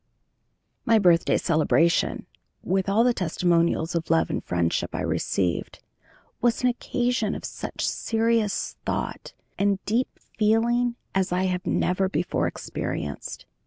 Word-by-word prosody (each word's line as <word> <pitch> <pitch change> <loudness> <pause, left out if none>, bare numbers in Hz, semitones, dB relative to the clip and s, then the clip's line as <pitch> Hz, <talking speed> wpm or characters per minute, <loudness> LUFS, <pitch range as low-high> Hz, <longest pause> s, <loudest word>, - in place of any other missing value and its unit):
My 230 -1 +4
birthday 175 -5 +4
celebration, 165 +1 +2 0.4
with 190 +1 0
all 215 +4 +4
the 245 0 +3
testimonials 170 -2 +1
of 165 -1 -2
love 165 0 +2
and - - -2
friendship 85 -1 -1
I - - -2
received, 90 -3 -1 0.6
was 240 +1 +1
an 250 - +5
occasion 245 -3 -1
of - - -6
such - - -4
serious 225 -2 0
thought - - -3 0.3
and 200 0 +2
deep 235 +5 +1 0.3
feeling 235 +3 +2 0.2
as 190 -1 0
I 180 +1 +1
had 185 0 -1
never 185 +1 +1
before 175 +1 0
experienced. 75 -2 -5
190 Hz, 125 wpm, -25 LUFS, 170-230 Hz, 0.6 s, an